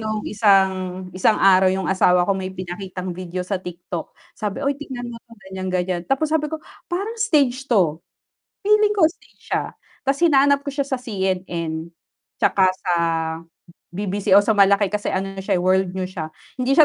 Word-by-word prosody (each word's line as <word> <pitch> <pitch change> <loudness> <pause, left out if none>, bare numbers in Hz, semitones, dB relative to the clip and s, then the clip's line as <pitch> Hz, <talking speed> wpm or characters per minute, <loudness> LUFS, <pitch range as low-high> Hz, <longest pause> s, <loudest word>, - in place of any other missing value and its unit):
nung 215 -1 -2
isang 190 -3 +2
isang 185 +4 +3
araw 190 -1 +6
yung 190 0 -2
asawa 180 -1 +4
ko 200 - +2
may 185 0 -3
ipakitang 185 0 -6
video 180 0 -5
sa 195 +1 -2
TikTok, 175 -1 -7 0.2
sabi, 210 +3 -3
"Uy, 280 0 +1
tignan 245 -4 -6
mo 230 - -8 0.3
ganyan, 190 0 -5
ganyan." 180 -1 -1
Tapos 295 +3 +1
sabi 310 -1 +2
ko, 315 +1 -5 0.3
"Parang 400 +6 -3
stage 280 - +2
to, 175 -10 +2 0.7
feeling 420 0 +4
ko 375 - +5
stage 325 - -9
siya." - - +1 0.4
Tas 275 +1 +1
hinanap 280 -3 +4
ko 280 - -3
siya 280 0 -1
sa 265 - 0
CNN. 180 -8 -3 0.5
tsaka 190 -1 +3 0.2
sa 180 -2 +2 1.0
BBC 200 0 -3
o 205 - +6
sa 220 - +3
malaki 200 -1 +4
kasi 210 0 -2
ano 195 +1 -2
na 195 - -7
siya, 195 0 0
eh, 175 - -1
World 185 0 +2
News 185 0 -3
siya. 160 -5 -4 0.3
Hindi 265 +2 +2
siya 315 - +9
195 Hz, 180 wpm, -22 LUFS, 185-265 Hz, 1.0 s, siya